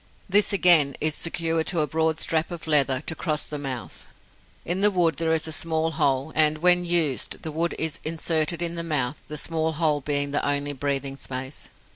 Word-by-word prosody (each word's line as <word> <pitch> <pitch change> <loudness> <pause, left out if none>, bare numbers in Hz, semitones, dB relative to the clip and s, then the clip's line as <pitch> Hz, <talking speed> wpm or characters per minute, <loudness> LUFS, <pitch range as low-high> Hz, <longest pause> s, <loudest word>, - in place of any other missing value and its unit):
This 205 +2 +4
again, 170 -8 +6
is 155 0 +1
secured 165 0 0
to 170 -4 +1
a - - +1
broad 160 +1 -1
strap 160 0 0
of 175 -2 -8
leather 140 -4 +2
to 160 - -4
cross 155 -3 -2
the 150 - -6
mouth. 130 -4 -7 0.6
In 180 +3 -2
the 210 - +6
wood 175 -4 +1
there 165 -1 -1
is 160 0 0
a - - -4
small 160 0 0
hole, 140 -2 0
and, 155 -1 +3
when 180 +2 +3
used, 165 -6 -1
the 160 - -4
wood 165 +3 -2
is 160 -2 -2
inserted 165 +1 -1
in 170 0 -3
the 170 - -4
mouth, 150 -5 -2
the 150 - -6
small 160 +1 0
hole 150 -2 +1
being 145 0 0
the 145 - -1
only 145 0 0
breathing 140 0 -3
space. 130 +1 -6
160 Hz, 200 wpm, -24 LUFS, 145-165 Hz, 0.6 s, again